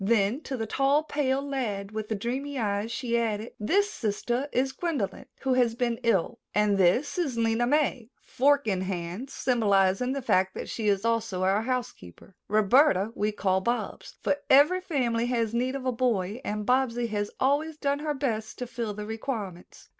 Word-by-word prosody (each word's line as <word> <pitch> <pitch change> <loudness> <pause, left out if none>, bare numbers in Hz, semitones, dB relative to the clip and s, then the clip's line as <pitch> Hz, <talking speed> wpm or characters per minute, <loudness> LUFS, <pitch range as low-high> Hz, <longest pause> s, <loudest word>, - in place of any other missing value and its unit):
Then 220 +5 +2
to 265 - -3
the 225 - -2
tall, 275 +6 +2
pale 280 -2 -1
lad 210 -8 -3
with 215 -1 -5
the 220 - 0
dreamy 265 +7 -3
eyes 210 -1 -1
she 235 -1 0
added: 220 -1 -2
"This 395 - +2
sister 240 +5 -2
is 265 +2 +1
Gwendolyn, 275 - -3
who 265 -1 +1
has 245 -3 +2
been 235 -1 -1
ill, 225 -7 +1 0.2
and 205 -1 +3
this 240 - +2
is 280 -9 -1
Lena 230 +1 +1
May, 270 -5 +1
fork 280 +2 +2
in 190 -4 0
hand, 185 +6 -4
symbolizing 215 -2 +2
the 275 - -3
fact 190 -5 +2
that - - -5
she 220 -2 -3
is 200 +1 +2
also 225 -5 0
our 195 +3 +2
housekeeper. 225 - -5
Roberta 215 0 +4
we 210 -1 0
call 190 -2 0
Bobs, 240 +5 -3
for 285 - +1
every 300 +7 +6
family 240 -9 0
has 230 -3 0
need 250 +3 0
of 265 -1 -5
a 255 - +2
boy 230 -3 -1
and 210 0 -3
Bobsy 250 -1 +1
has 205 -1 -2
always 290 +4 +1
done 285 -1 0
her 300 0 -2
best 225 -6 -2
to 250 - -4
fill 230 -3 -4
the 210 0 -5
requirements." 215 -5 -6
235 Hz, 180 wpm, -27 LUFS, 210-265 Hz, 0.2 s, every